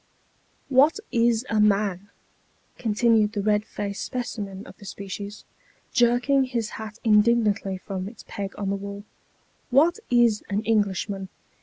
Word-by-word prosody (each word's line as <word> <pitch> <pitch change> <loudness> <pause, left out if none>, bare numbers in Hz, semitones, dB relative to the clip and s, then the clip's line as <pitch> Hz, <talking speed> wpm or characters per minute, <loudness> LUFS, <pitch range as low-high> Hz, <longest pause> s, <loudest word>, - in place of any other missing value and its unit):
" - - -40
What 310 +8 +3
is 235 0 +2
a 220 - 0
man? 200 -2 +2 0.4
" - - -39
continued 220 -1 +2
the 205 -2 -2
red 210 0 +2
faced 200 -2 -5
specimen 205 -5 -5
of - - -12
the 205 - -12
species, 200 +1 -7 0.5
jerking 250 +2 +3
his 235 -4 -2
hat 220 0 -8
indignantly 210 -3 +3
from 185 0 -5
its 225 - -14
peg 195 -1 -5
on 200 -1 -2
the - - 0
wall. 200 +1 -7 0.3
" - - -39
What 315 - +4
is 240 -3 +3
an 205 +1 -1
Englishman? 200 -3 0
210 Hz, 150 wpm, -25 LUFS, 200-235 Hz, 0.5 s, What